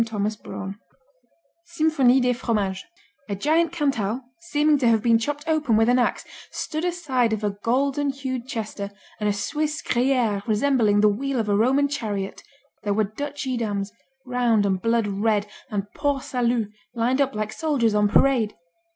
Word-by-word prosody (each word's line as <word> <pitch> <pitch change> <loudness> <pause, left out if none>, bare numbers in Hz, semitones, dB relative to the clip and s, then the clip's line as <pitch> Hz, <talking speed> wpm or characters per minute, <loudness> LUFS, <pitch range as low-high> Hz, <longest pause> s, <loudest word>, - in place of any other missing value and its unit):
Thomas 215 -1 -2
Braun 200 -1 -7 0.8
Symphonie 310 -7 +3
des 250 0 +2
Fromages 210 -6 -1 0.4
A 200 - -1
giant 315 - +2
Cantal, 260 -9 0 0.2
seeming 300 -3 +2
to 250 - +2
have 225 -2 +3
been 230 -1 +4
chopped 290 +5 -3
open 300 -8 +2
with 225 +1 +4
an 250 +1 +4
ax, 245 - 0 0.2
stood 310 +1 -4
aside 285 -10 0
of 215 -1 -3
a 205 - +1
golden 270 +7 0
hued 260 -2 -4
Chester 215 -5 -4 0.3
and 210 -1 +1
a - - +3
Swiss 300 +9 -2
Gruyère 240 -5 +1
resembling 220 -2 +3
the 210 - +6
wheel 260 +5 0
of 220 - -1
a 205 - +3
Roman 265 +7 +3
chariot 210 -8 -4 0.4
There 205 -1 -1
were 215 - +3
Dutch 290 +1 -4
Edams, 215 -6 -2 0.3
round 240 -4 +2
and 190 -2 0
blood 230 0 +2
red, 205 +1 +1 0.2
and 200 -2 -2
Port 285 -2 -1
Saluts 235 -4 0 0.2
lined 245 +4 +1
up 270 -4 0
like 215 0 -3
soldiers 280 -9 +1
on 210 0 +3
parade. 230 -2 +3
235 Hz, 165 wpm, -24 LUFS, 210-275 Hz, 0.8 s, the